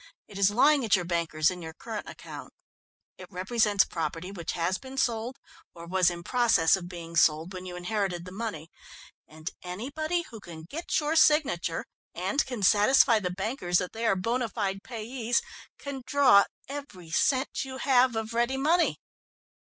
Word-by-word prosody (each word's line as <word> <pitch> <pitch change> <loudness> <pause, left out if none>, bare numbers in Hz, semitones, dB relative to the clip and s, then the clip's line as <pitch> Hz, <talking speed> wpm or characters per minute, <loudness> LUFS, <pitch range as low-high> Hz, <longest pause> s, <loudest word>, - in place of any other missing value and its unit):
"It 200 -1 -9
is 195 -1 +5
lying 275 +6 +4
at 220 - +4
your 180 -2 -2
bankers 170 -2 +1
in 180 -1 -7
your 160 -1 -8
current 220 -2 -6
account. - - -10 0.7
It - - -9
represents 205 +2 +2
property 165 +2 -4
which 175 -4 -5
has 175 +2 -1
been 265 0 -10
sold 240 -1 -1 0.4
or 170 0 -9
was 180 0 +3
in 170 -1 -6
process 235 -8 +3
of 175 -2 -7
being 170 -2 -8
sold 160 +2 +3
when 185 0 -7
you 180 - -7
inherited 180 -1 -2
the 180 - -9
money, 190 -6 -5 0.6
and 155 +2 -7
anybody 285 - -3
who 225 - -9
can 165 -5 -10
get 305 - -2
your 305 +1 -1
signature 285 - +3 0.3
and 190 - 0
can 245 -6 -5
satisfy 220 +4 +5
the 185 -3 -2
bankers 180 -1 -1
that 180 - -2
they 225 +1 -2
are 195 - +3
bona 230 +5 -1
fide 195 -2 -2
payees, 235 +1 -2 0.4
can 280 -2 -6
draw 260 -8 +6 0.2
every 265 - -8
cent 260 - +1
you 260 -1 -7
have 255 -2 +3
of 225 0 -3
ready 240 +3 +1
money. 330 +6 +2
205 Hz, 170 wpm, -28 LUFS, 175-255 Hz, 0.7 s, draw